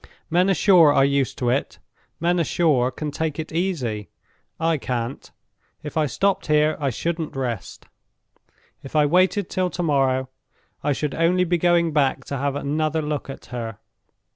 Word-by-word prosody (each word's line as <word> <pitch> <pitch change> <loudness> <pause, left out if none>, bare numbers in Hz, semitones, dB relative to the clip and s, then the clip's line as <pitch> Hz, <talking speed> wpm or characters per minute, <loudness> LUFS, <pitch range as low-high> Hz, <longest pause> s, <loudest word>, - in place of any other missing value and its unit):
Men 180 +3 +3
ashore 180 -5 +6
are 135 -1 +4
used 140 -2 0
to 120 -1 0
it; 135 +3 -1 0.4
men 175 +2 +1
ashore 150 -6 +2
can 150 +3 -5
take 155 -1 -3
it 160 -1 -5
easy. 145 - -2 0.5
I 165 -2 +1
can't. 125 0 -4 0.5
If 150 - -7
I 155 -2 +2
stopped 195 +8 0
here 150 0 +3
I 140 -2 0
shouldn't 160 +5 -3
rest. 120 -8 -4 1.0
If 135 - -10
I 150 -1 +5
waited 185 +5 +2
till 185 -1 -1
to 175 - -4
morrow, 135 -4 +1 0.6
I 145 - +1
should 145 +1 -2
only 175 +2 +2
be 175 -1 0
going 170 -1 +2
back 135 -3 +1
to 140 - -4
have 140 0 -1
another 155 +2 -1
look 150 -1 -3
at 135 - -8
her. 115 -3 -5
150 Hz, 165 wpm, -23 LUFS, 135-170 Hz, 1.0 s, ashore